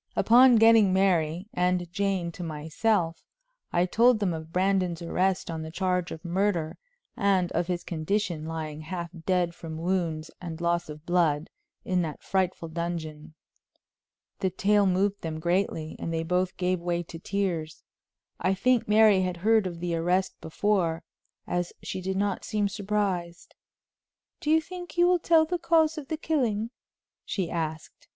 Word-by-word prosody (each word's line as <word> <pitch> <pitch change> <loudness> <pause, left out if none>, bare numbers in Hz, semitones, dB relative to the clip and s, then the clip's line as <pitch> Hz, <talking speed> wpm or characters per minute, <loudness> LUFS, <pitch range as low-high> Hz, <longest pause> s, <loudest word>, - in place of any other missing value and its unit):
Upon 245 +2 +6
getting 225 -3 +6
Mary 180 -2 +1
and 180 0 +1
Jane 195 -3 -1
to 175 - -10
myself, 165 +3 -1 0.5
I 175 +1 +2
told 235 +6 +4
them 195 -4 0
of 160 0 -7
Brandon's 185 -2 +1
arrest 185 +1 0
on 160 -1 -4
the 160 - -6
charge 180 0 -1
of 160 +2 -8
murder, 175 -3 0 0.4
and 190 -3 +2
of 170 +1 -1
his 175 -1 -2
condition, 170 0 -2
lying 155 -2 -5
half 170 +1 -5 0.2
dead 180 -2 +1
from 160 -2 -8
wounds 165 -2 -2
and 170 -2 -6
loss 170 -1 0
of 150 +1 -9
blood, 165 -4 +1 0.3
in 185 -1 +1
that 155 -3 -5
frightful 185 -3 -1
dungeon. 160 -2 -5 1.0
The 190 - +1
tale 200 +2 +2
moved 195 +2 +1
them 160 -1 -4
greatly, 170 -2 -1
and 165 - -4
they 165 0 -1
both 180 +2 0
gave 180 0 0
way 175 0 -1
to 165 0 -10
tears. 175 -5 -3 0.6
I 185 +2 +1
think 250 +4 +2
Mary 210 -2 +5
had 180 -1 -2
heard 215 +2 +3
of 170 -2 -7
the 175 0 -2
arrest 180 +3 +1
before, 170 -1 0 0.4
as 175 0 -2
she 185 - -4
did 190 +1 -2
not 200 -1 -1
seem 210 -1 0
surprised. 195 -4 -2 0.9
"Do 300 - -3
you 320 +1 +5
think 355 +2 -9
he 350 - +3
will 355 0 +4
tell 325 -1 +4
the 355 +2 -2
cause 325 -2 +3
of 280 - -10
the 315 - -3
killing?" 235 -9 -1 0.5
she 185 -5 -3
asked. 160 -1 -5
180 Hz, 160 wpm, -27 LUFS, 165-205 Hz, 1.0 s, Upon